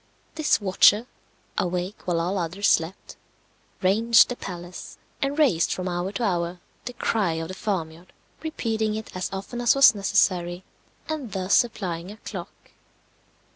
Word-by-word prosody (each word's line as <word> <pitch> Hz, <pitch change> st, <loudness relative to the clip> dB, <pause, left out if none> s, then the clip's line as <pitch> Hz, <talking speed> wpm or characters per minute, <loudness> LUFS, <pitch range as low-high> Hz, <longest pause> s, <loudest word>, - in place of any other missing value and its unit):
This 310 Hz, -1 st, +2 dB
watcher, 205 Hz, +2 st, +4 dB, 0.5 s
awake 180 Hz, +3 st, -3 dB
while 170 Hz, -2 st, +1 dB
all 180 Hz, +4 st, -1 dB
others 180 Hz, +4 st, -1 dB
slept, 165 Hz, +4 st, 0 dB, 0.7 s
ranged 225 Hz, +5 st, +5 dB
the 245 Hz, -, -3 dB
palace, 175 Hz, -4 st, -8 dB, 0.2 s
and 275 Hz, +2 st, -1 dB
raised 225 Hz, -, +3 dB
from 185 Hz, 0 st, -2 dB
hour 175 Hz, +1 st, -2 dB
to 220 Hz, -, -3 dB
hour 175 Hz, -3 st, -1 dB, 0.3 s
the 245 Hz, -, -5 dB
cry 210 Hz, -7 st, 0 dB
of 160 Hz, +1 st, -4 dB
the -, -, -5 dB
farmyard, 175 Hz, -4 st, -4 dB, 0.3 s
repeating 225 Hz, -9 st, -2 dB
it 220 Hz, -3 st, -7 dB
as 185 Hz, -, -2 dB
often 195 Hz, +5 st, -5 dB
as 240 Hz, +1 st, +4 dB
was 275 Hz, -3 st, +8 dB
necessary, 185 Hz, -3 st, +1 dB, 0.4 s
and 295 Hz, -9 st, -4 dB
thus 190 Hz, 0 st, -1 dB
supplying 185 Hz, -7 st, 0 dB
a 210 Hz, -, -11 dB
clock. 190 Hz, -4 st, -9 dB
190 Hz, 145 wpm, -25 LUFS, 175-220 Hz, 0.7 s, was